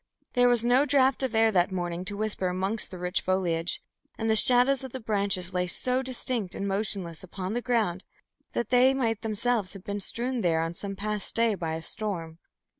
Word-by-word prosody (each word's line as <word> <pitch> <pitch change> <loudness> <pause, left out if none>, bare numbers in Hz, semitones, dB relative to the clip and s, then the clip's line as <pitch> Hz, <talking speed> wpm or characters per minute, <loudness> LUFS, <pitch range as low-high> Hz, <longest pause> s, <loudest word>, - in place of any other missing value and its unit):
There 245 0 +4
was 240 -1 +2
no 250 +3 +5
draught 270 -2 +3
of 260 -4 -1
air 225 0 +4
that 180 -2 +2
morning 175 -1 -3
to 200 +1 -3
whisper 215 -3 -1
amongst 190 +4 -1
the 185 - -8
rich 180 +1 -1
foliage, 175 -3 0 0.3
and 225 0 0
the - - +4
shadows 255 +4 +4
of 265 - -8
the 260 - -4
branches 200 -5 -1
lay 180 0 0
so 250 +7 0
distinct 245 -6 -1
and 200 - -3
motionless 195 -4 -1
upon 185 +2 -5
the 240 - -1
ground 220 -8 0 0.5
that 235 - -2
they 255 +2 +5
might 225 -5 0
themselves 220 -2 -1
have 195 -2 -10
been 205 0 -4
branches 195 - +2
strewn 245 +1 -2
there 165 -4 +2
on 165 +1 -3
some 195 +3 -5
past 210 +1 -2
day 230 -1 +3
by 165 -5 -3
a 160 - -6
storm. 170 -7 -4
210 Hz, 205 wpm, -27 LUFS, 185-240 Hz, 0.5 s, no